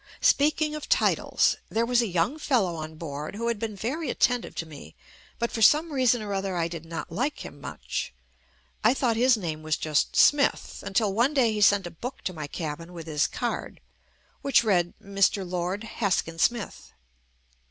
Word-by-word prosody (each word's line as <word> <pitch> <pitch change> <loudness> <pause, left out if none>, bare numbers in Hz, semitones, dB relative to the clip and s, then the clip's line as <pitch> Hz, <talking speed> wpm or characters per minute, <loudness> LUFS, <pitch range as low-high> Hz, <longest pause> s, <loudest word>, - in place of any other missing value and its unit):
Speaking 300 +1 +3
of 305 -1 -6
titles - - +2
— - - -37
there 230 +1 +1
was 245 0 +3
a 230 - 0
young 180 - 0
fel 260 -7 +2
low 175 -2 -3
on 155 0 -7
board, 150 +1 -6
who 230 +2 -2
had 230 -3 -2
been 220 -2 -4
very 270 +9 -3
attentive 245 0 0
to 165 - -3
me 145 - -12 0.4
but 235 - -1
for 225 - -4
some 305 +8 +5
reason 250 -4 +2
or 205 -1 -4
other 195 -1 -2
I 165 -1 +1
did 165 -1 -7
not 165 0 -6
like 255 - -2
him 145 - -11
much. - - -5 0.7
I 230 +5 +4
thought 245 -4 +1
his 245 +1 +4
name 160 -6 -4
was 155 -1 -1
just 155 -2 0
"Smith" 290 -1 +3
until 200 0 0
one 245 +8 +2
day 240 -5 +3
he 210 - -2
sent 200 -1 +5
a 175 - -6
book 245 - -7
to 185 - -3
my 155 -3 -6
cabin 165 +2 -6
with 165 -2 -8
his 150 -2 +1
card, - - -4 0.6
which 275 -4 +4
read 180 -6 +1
"Mr. 195 -2 +1
Lord 180 +3 -2
Haskin 190 -7 -1
Smith." 235 +3 -1
200 Hz, 195 wpm, -26 LUFS, 165-240 Hz, 0.7 s, some